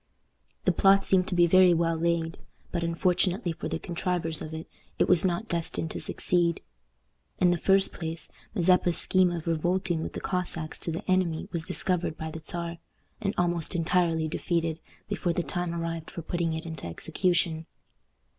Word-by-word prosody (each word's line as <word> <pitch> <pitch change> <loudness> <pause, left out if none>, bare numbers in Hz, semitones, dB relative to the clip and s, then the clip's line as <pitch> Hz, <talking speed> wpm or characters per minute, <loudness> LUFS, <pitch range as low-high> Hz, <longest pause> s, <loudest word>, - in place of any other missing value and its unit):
The - - +5
plot 195 0 +4
seemed 185 -1 +3
to 180 - -1
be 175 -1 +6
very 180 0 +6
well 165 0 +1
laid; 165 0 -1 0.3
but, 170 - -1
unfortunately 180 +2 +1
for - - -5
the - - -2
contrivers 170 -2 -2
of 155 - -6
it, 160 0 -7 0.3
it - - +2
was 180 -3 +4
not 185 +4 0
destined 165 -2 -2
to - - -4
succeed. 170 -2 +2 0.8
In 180 -1 +4
the 175 - 0
first 195 +2 +3
place, 165 -1 -3 0.2
Mazeppa's 180 -2 +3
scheme 185 -1 +4
of 170 -2 -4
revolting 175 +1 0
with - - -5
the - - -4
Cossacks 175 -3 -2
to 165 - -1
the 165 - -5
enemy 185 -1 +1
was 165 -2 -3
discovered 180 -3 +1
by 160 0 -5
the 160 - -7
Czar, 170 0 -3 0.4
and 205 0 -1
almost 175 -1 0
entirely 165 -1 +1
defeated, 165 0 -1 0.3
before 175 - -1
the 175 - -1
time 175 0 -3
arrived 165 -1 -4
for 170 - -7
putting 170 0 -1
it 160 +1 -5
into 160 - -6
execution. 165 - 0
170 Hz, 175 wpm, -27 LUFS, 165-180 Hz, 0.8 s, be